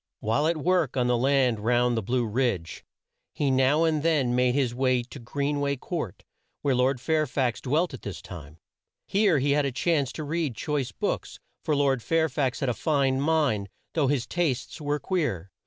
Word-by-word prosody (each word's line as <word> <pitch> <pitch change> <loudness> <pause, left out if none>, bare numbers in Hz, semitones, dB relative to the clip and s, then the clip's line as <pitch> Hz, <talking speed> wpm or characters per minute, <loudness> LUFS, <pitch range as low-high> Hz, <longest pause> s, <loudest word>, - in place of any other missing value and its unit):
While 115 +8 +1
at 165 0 +1
work 165 -4 +1
on 125 - +2
the 125 0 +2
land 130 -2 +2
round 120 +2 +2
the 115 - 0
Blue 120 +4 0
Ridge, 110 -7 -1 0.5
he 140 -2 +1
now 135 +4 +3
and 160 -2 +1
then 145 -6 +2
made 125 0 +2
his 130 -4 +1
way 130 -1 +1
to 130 +3 -11
Green 140 +4 -2
way 140 -1 0
Court 155 - -5 0.4
where 140 -2 +2
Lord 130 +1 +2
Fair 155 +4 +1
fax 125 -2 -1
dwelt 155 +5 0
at 130 - -8
this 100 - -6
time. 75 -4 -10 0.5
Here 200 -5 +3
he 140 +1 +1
had 145 +1 +3
a - - -2
chance 145 0 0
to 155 - -5
read 150 -4 -2
choice 140 +3 -2
books, - - -3 0.2
for 150 - +1
Lord 135 -3 +2
Fair 160 +4 +1
fax 135 -2 -1
had 135 - +1
a - - +1
fine 135 +2 +1
mind 145 -10 +1 0.2
though 150 -4 +2
his 135 -3 0
tastes 155 -4 -2
were 145 0 0
queer. 125 - -2
135 Hz, 195 wpm, -26 LUFS, 125-150 Hz, 0.5 s, now